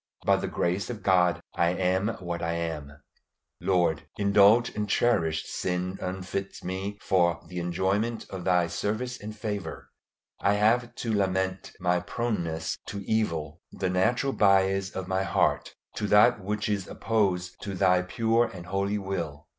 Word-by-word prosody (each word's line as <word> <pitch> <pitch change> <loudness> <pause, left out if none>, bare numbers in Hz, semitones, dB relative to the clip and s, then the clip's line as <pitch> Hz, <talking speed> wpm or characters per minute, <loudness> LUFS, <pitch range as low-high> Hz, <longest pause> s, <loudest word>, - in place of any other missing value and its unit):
By - - +4
the - - -3
grace 90 +6 -1
of 115 -4 -6
God 90 -2 +3
I 85 - +2
am 95 +2 +1
what 85 -1 -4
I 85 0 -1
am. 75 -4 -5 0.6
Lord, 90 -5 +1
indulged 100 +4 +5
and 105 -1 -2
cherished 80 -10 +2
sin 90 +1 -3
unfits 95 +1 -4
me 95 +3 -4
for 85 -3 +2
the 90 -1 -5
enjoyment 95 +6 -1
of 95 -2 -5
Thy 90 -1 +3
service 110 +8 -3
and 105 +1 -7
favor. 105 -2 -5 0.5
I 100 - +2
have 115 +3 +2
to 115 -2 -2
lament 95 -2 -1
my 90 -1 +2
proneness 85 -7 -2
to 100 0 -5
evil, 85 -8 -1
the 95 -2 -2
natural 120 +9 +1
bias 95 -1 +3
of 95 -1 -6
my 95 0 0
heart 95 - 0 0.2
to 105 - -1
that 105 +1 +5
which 105 +2 -2
is 100 -3 -1
opposed 95 -5 -1
to 100 -2 -4
Thy 90 -1 +4
pure 115 +5 +1
and 90 -2 -9
holy 100 +3 -1
will. 85 -7 -4
95 Hz, 155 wpm, -27 LUFS, 90-105 Hz, 0.6 s, indulged